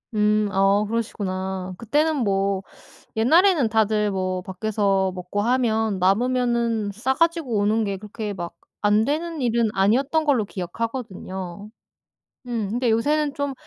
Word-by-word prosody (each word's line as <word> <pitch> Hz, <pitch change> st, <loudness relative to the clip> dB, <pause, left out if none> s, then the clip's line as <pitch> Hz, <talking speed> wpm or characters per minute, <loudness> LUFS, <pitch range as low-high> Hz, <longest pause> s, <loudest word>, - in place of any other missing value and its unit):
음. 210 Hz, 0 st, +2 dB
어 195 Hz, +2 st, +3 dB
그러시구나. 190 Hz, -4 st, -3 dB
그때는 300 Hz, +6 st, +1 dB
뭐 195 Hz, -4 st, 0 dB, 0.5 s
옛날에는 315 Hz, -, +4 dB
다들 215 Hz, -1 st, +2 dB
뭐 185 Hz, -1 st, -2 dB
밖에서 195 Hz, -1 st, 0 dB
먹고 180 Hz, +3 st, -3 dB
하면 225 Hz, -3 st, +1 dB
남으면은 235 Hz, +1 st, +1 dB
싸 255 Hz, +6 st, -1 dB
가지고 330 Hz, -8 st, +1 dB
오는 215 Hz, +2 st, +2 dB
게 200 Hz, -1 st, -2 dB
그렇게 210 Hz, +1 st, -6 dB
막 170 Hz, -2 st, -6 dB, 0.3 s
안 210 Hz, +1 st, +4 dB
되는 315 Hz, +1 st, -2 dB
일은 235 Hz, -2 st, +2 dB
아니었던 265 Hz, +11 st, +2 dB
걸로 255 Hz, -8 st, +2 dB
기억하거든요. 190 Hz, -1 st, -5 dB, 0.8 s
음. 225 Hz, -5 st, -2 dB
근데 240 Hz, +2 st, 0 dB
요새는 290 Hz, +6 st, +1 dB
좀 285 Hz, -1 st, -2 dB
215 Hz, 280 characters per minute, -23 LUFS, 195-250 Hz, 0.8 s, 옛날에는